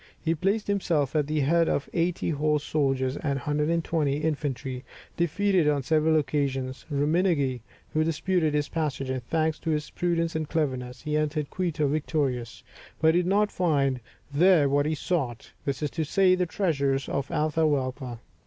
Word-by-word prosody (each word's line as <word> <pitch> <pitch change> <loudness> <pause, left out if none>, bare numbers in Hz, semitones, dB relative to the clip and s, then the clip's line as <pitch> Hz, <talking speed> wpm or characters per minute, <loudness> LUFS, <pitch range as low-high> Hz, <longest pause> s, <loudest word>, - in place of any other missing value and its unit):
He 165 - 0
placed 195 +6 0
himself 165 -8 0
at 150 -2 +2
the 155 0 0
head 165 +4 +3
of 140 - -1
eighty 170 0 0
horse 150 0 +1
soldiers 135 -3 0
and 140 -3 -1
120 150 0 0
infantry, 140 -4 -3 0.3
defeated 175 -1 +2
on 145 -2 +1
several 155 +3 +3
occasions 135 -3 -2
Ruminagui, 145 - +1 0.3
who 155 - +2
disputed 165 0 0
his 150 -1 +1
passage, 140 -5 -2
and 130 -1 -3
thanks 160 +4 0
to - - -4
his 150 -1 -1
prudence 170 -2 -1
and 155 -1 -2
cleverness, 130 -6 -2
he 150 0 -1
entered 150 -1 -1
Quito 165 -5 0
victorious; 140 -5 -2 0.4
but 160 +1 +4
he 175 - +4
did 175 - -3
not 205 +2 +2
find 140 -7 +1 0.3
there 165 -1 +5
what 145 +1 +2
he 155 - 0
sought, 140 -8 -2
that 140 +1 -2
is 150 - -1
to 160 - -1
say, 185 +4 +3
the 180 -1 +1
treasures 140 -7 0
of 140 0 -2
Atahualpa. 145 -5 0
150 Hz, 165 wpm, -27 LUFS, 140-165 Hz, 0.4 s, there